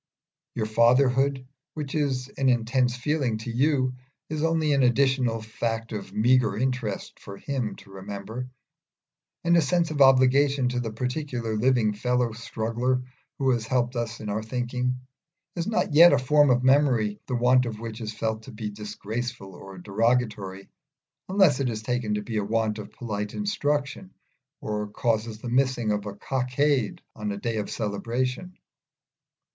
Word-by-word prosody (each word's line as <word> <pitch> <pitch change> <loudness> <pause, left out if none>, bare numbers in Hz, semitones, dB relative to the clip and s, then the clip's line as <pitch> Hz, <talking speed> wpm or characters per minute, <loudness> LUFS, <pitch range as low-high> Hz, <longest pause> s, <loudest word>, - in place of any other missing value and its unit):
Your 110 - -1
fatherhood, 130 +4 +3 0.3
which 150 -3 -5
is 135 -4 0
an 135 -1 0
intense 125 +1 +1
feeling 130 -3 0
to 110 +2 -6
you, 130 +1 +1 0.4
is 155 -1 -3
only 160 -2 +2
an 140 - +3
additional 125 -2 +2
fact 115 0 -3
of 105 -2 -6
meagre 115 -2 +3
interest 125 -4 -2
for 100 0 -10
him 130 -4 -3
to 100 - -16
remember; 105 +6 -6 0.9
and 170 0 +4
a 170 - +6
sense 165 +3 +1
of 145 -2 -1
obligation 135 0 +5
to 125 0 -2
the 115 -2 -3
particular 125 -1 -3
living 115 -1 +2
fellow 125 +2 0
struggler 120 +2 -2 0.3
who 135 -1 +2
has 115 -2 -1
helped 125 0 0
us 120 -1 -3
in 105 - -7
our 105 +1 -1
thinking, 125 +2 -2 0.6
is 170 -1 -2
not 210 -6 0
yet 170 +1 +9
a - - +5
form 145 +3 +4
of 125 0 +3
memory 130 -6 +3
the 125 - -1
want 125 +1 +4
of 110 -2 -5
which 115 0 -7
is 110 -1 -4
felt 110 0 -2
to 120 - -11
be 105 -1 -5
disgraceful 105 0 -5
or 95 +2 -11
derogatory, 105 -1 -1 0.6
unless 190 -8 +4
it 135 -2 0
is 110 -2 -4
taken 120 -2 -1
to 105 - -3
be 110 0 -4
a 105 - +1
want 110 0 0
of 105 - -8
polite 105 -3 -5
instruction, 150 -4 -2 0.5
or 105 0 -3
causes 110 +1 -1
the 115 - -8
missing 125 -2 +1
of 105 0 -2
a 100 - -6
cockade 130 +1 0
on 105 -1 -3
a 100 - -4
day 115 +2 -2
of 105 - -3
celebration. 125 - -3
120 Hz, 160 wpm, -26 LUFS, 110-135 Hz, 0.9 s, yet